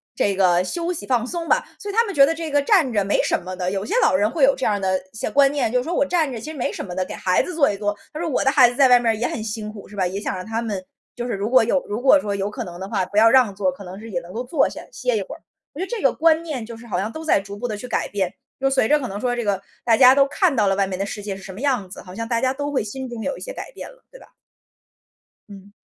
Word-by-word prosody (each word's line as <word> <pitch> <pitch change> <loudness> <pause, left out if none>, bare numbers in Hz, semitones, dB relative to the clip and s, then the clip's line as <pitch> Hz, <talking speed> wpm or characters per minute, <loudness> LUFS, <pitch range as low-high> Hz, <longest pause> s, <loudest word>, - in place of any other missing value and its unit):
这 200 -1 +1
个 180 -2 +3
休 340 - -3
息 345 - -5
放 245 -2 0
松 335 +3 -4
吧。 - - +3
所 410 - -6
以 - - -10
他 460 +2 +4
们 400 -4 -5
觉 275 - +8
得 320 - 0
这 325 -1 -5
个 290 - +2
站 295 - +3
着 205 -3 +1
没 200 - +1
什 - - 0
么 185 +1 -7
的， 180 -1 -2
有 195 +1 -3
些 - - -4
老 - - +4
人 205 +3 +3
会 315 -4 0
有 275 +1 +6
这 - - -3
样 210 - +2
儿 - - -5
的 190 -1 +1 0.2
一 - - -18
些 220 - -3
观 280 -1 +4
念， 285 -6 0
就 250 - +2
是 250 - 0
说 335 - -3
我 - - +3
站 310 -1 0
着 240 - -5
其 305 - -7
实 315 - -7
没 245 - -2
什 - - -5
么 180 -2 -7
的， 185 0 -1
给 - - -7
孩 185 -1 +1
子 365 - -6
坐 295 -7 +3
一 200 - -5
坐。 205 0 -1 0.2
他 305 - -7
说 340 - -2
我 290 - 0
的 270 - +3
孩 265 -3 +6
子 245 - -4
在 270 0 +6
外 245 -1 +7
面 230 -2 +2
儿 - - -1
也 235 +3 -1
很 220 - -4
辛 215 -1 -5
苦 210 -2 -11
是 205 - -13
吧？ 190 -2 +1
也 190 +3 -4
想 205 - -3
让 185 - -5
他 225 +1 -2
们 205 -5 -4 0.3
就 240 - -4
是 245 - -3
如 200 +3 -2
果 255 -2 +5
有 260 +4 +1
如 210 +3 -3
果 275 +3 +6
说 205 -6 -3
有 200 +1 -2
可 240 +3 -5
能 175 -4 -9
的 190 - -5
话， 195 -4 0
不 200 +3 -6
要 225 +1 +7
让 245 -4 +4
座 190 -2 +1
儿， - - -1
可 185 +3 -11
能 185 +2 -9
是 225 - -10
也 175 - -1
能 170 +1 -12
够 235 +3 -3
坐 265 +4 +2
下， - - -8
歇 - - -1
一 - - -1
会 - - -7
儿。 - - -17 0.3
我 290 - -10
觉 375 - -1
得 - - -14
这 475 -3 -3
个 270 - +4
观 325 0 +3
念 295 -8 -4
就 230 +1 -9
是 235 - -13
好 180 -4 -1
像 215 +3 -2
都 315 +4 -7
在 315 - +3
逐 200 +1 -8
步 245 - -3
地 215 - -3
去 250 +4 -8
改 - - -1
变， 190 -3 -2 0.3
就 270 0 +2
随 265 -5 +2
着 300 0 +4
可 255 - -4
能 200 +1 -5
说 245 +1 -1
这 240 - -2
个， 200 -2 -1 0.2
大 230 -2 +4
家 255 -1 +8
都 275 0 +5
看 340 +1 +1
到 210 -4 +2
了 195 - +2
外 195 0 +2
面 185 - -4
的 195 - 0
世 205 0 -6
界 200 -2 -4
是 195 - -11
什 190 - -8
么 205 - -9
样 250 -10 0
子， 185 - -9
好 180 - -11
像 230 +3 -5
大 230 -1 0
家 260 +2 +1
都 285 +1 -4
会 275 - 0
心 260 +5 -6
中 235 -2 -6
有 280 - -2
一 - - -12
些 - - -6
改 - - -8
变 - - -9
了， - - -19
对 - - -14
吧？ - - -16 1.2
嗯。 200 0 -13
230 Hz, 380 characters per minute, -22 LUFS, 200-280 Hz, 1.2 s, 觉